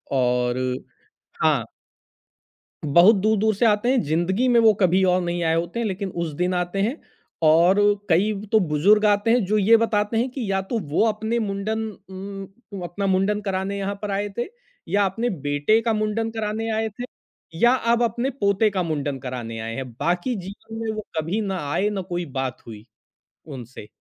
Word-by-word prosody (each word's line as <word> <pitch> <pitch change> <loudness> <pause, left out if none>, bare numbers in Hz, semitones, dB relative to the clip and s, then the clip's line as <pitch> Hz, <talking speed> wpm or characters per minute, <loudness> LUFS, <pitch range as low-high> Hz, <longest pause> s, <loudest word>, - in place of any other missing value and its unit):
और 125 -1 +1 0.9
हाँ। - - +3 1.2
बहुत 170 +9 +6
दूर-दूर 215 +2 +2
से 235 - +1
आते 210 +2 +3
हैं। 260 -3 +3
ज़िंदगी 175 - 0
में 240 -2 +5
वो 220 -2 +6
कभी 185 +1 +4
और 180 0 +3
नहीं 175 0 -2
आए 160 0 +2
होते 170 +7 -2
हैं 235 - -1
लेकिन 195 0 -3
उस 160 - -4
दिन 180 +1 +1
आते 180 +2 -1
हैं 240 +9 -1 0.5
और 170 +6 +5 0.3
कई 190 +6 +3
व 205 +1 -7
तो 220 - +5
बुज़ुर्ग 190 +6 +3
आते 205 +2 +3
हैं, 240 -3 +3
जो 215 +3 +1
ये 220 +3 +5
बताते 220 -1 0
हैं 250 +3 +1
कि 235 -7 -3
या 195 0 +1
तो 225 +4 -3
वो 160 +5 0
अपने 220 +2 -1
मुंडन 215 +2 -2 0.2
उम, 195 +1 -9
अपना 195 +3 -3
मुंडन 195 +2 +1
कराने 195 0 -2
यहाँ 200 0 -3
पर 205 -1 -3
आए 205 +1 -1
थे 240 - 0 0.5
या 200 +1 +3
अपने 225 +6 -1
बेटे 145 +6 +1
का 225 -1 0
मुंडन 215 +1 -1
कराने 220 0 -3
आए 220 0 -1
थे, 215 +4 -8 0.5
या 240 +8 +4
अब 235 -1 +1
अपने 235 +3 0
पोते 210 -4 +1
का 190 -3 -1
मुंडन 145 -4 -3
कराने 120 -3 -6
आए 115 +1 -5
हैं। 130 -1 -5
बाकी 175 +8 0
जीवन 205 +3 -9
में 220 - -1
वो 215 - -4
कभी 170 +8 -1
ना 195 -3 -2
आए, 205 +2 +1
ना 200 -2 -3
कोई 175 -1 -4
बात 130 -3 -4
हुई 110 -1 -10 0.6
उनसे। 125 -6 -9
200 Hz, 185 wpm, -23 LUFS, 175-220 Hz, 1.2 s, बहुत